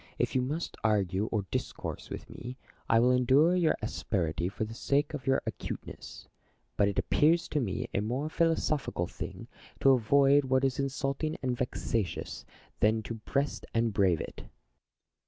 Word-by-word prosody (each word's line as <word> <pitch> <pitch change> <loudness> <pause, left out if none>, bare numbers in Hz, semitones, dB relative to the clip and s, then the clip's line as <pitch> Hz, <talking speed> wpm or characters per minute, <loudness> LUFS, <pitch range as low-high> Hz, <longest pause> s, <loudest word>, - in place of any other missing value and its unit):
if - - 0
you 130 - +2
must 150 +7 -3
argue 100 -2 +1
or 110 -4 -1
discourse - - -4
with - - -7
me, 125 +2 -8 0.3
I 115 - +5
will 125 +2 +4
endure 130 +7 +4
your 175 -3 +3
asperity 90 -5 -1
for 100 - -3
the 110 +1 -5
sake 140 +6 0
of 135 -4 -6
your 135 0 +3
acute - - -5
ness; - - -10 0.5
but 100 - +3
it 100 - -2
appears 165 +3 +3
to 150 - 0
mo 95 -6 -2
a - - +1
more 125 +8 -1
philosophical 155 - 0
thing - - -7 0.3
to 135 - +6
avoid 140 +3 +4
what 130 0 +2
is 135 -1 +1
insulting 140 +3 -1
and 125 -1 0
vexatious, 110 - -3 0.3
than 110 +1 +3
to 115 - -5
breast 135 +6 -2
and 115 -1 +2
brave 95 -4 +3
it. - - -8
125 Hz, 165 wpm, -30 LUFS, 110-140 Hz, 0.5 s, to